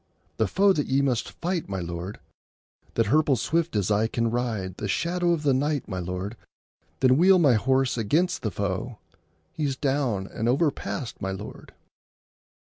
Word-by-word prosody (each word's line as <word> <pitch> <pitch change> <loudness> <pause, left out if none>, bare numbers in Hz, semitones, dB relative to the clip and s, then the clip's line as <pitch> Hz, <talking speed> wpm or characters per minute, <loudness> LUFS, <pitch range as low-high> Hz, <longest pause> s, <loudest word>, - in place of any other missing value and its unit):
— - - -40
The 110 - +3
foe 195 - +4
that 145 -5 -1
ye 135 +1 +2
must 125 -4 0
fight, 175 - -1
my 95 -1 -2
lord.— 85 +3 -5 0.8
That 115 - +3
hirples 145 +3 +3
swift 165 +4 0
as 105 0 +1
I 105 +2 +3
can 115 0 -1
ride?— 110 -7 -2
The 105 - -3
shadow 175 - 0
of 165 -3 0
the 140 -2 +3
night, 145 +1 0
my 95 -2 -4
lord.— 90 +4 -4 0.7
Then 130 0 +5
wheel 185 +3 +6
my 150 -8 +5
horse 130 +2 +1
against 165 - +1
the 110 - -1
foe!— 100 +5 -3 0.6
He's 145 -4 -1
down 130 -8 0
and 110 +4 -2
overpast, 140 -2 -1
my 95 - -2
lord. 95 - -9
125 Hz, 170 wpm, -26 LUFS, 100-150 Hz, 0.8 s, wheel